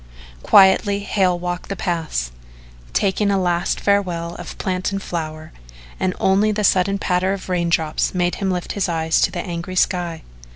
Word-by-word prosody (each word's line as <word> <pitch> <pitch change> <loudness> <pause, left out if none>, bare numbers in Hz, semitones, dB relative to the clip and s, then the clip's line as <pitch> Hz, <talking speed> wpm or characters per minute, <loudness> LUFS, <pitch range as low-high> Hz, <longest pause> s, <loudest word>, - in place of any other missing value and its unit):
Quietly 200 - +5
Hale 190 -3 +1
walked 175 0 -5
the 200 - -2
paths, 160 - -2 0.6
taking 200 +1 +1
a 195 -1 +2
last 175 0 0
farewell 180 -4 0
of - - -8
plant 185 +1 -2
and 195 - -2
flower, 155 -4 -5 0.5
and 185 -1 0
only 200 +3 +3
the 210 0 -1
sudden 195 0 +3
patter 185 0 0
of 195 -1 -7
raindrops 170 -3 0
made 180 0 +1
him 195 - 0
lift 180 -1 -2
his 200 -3 -1
eyes 160 -1 +1
to - - +3
the 175 - -3
angry 175 +1 -5
sky. 175 -3 0
180 Hz, 165 wpm, -20 LUFS, 170-195 Hz, 0.6 s, Quietly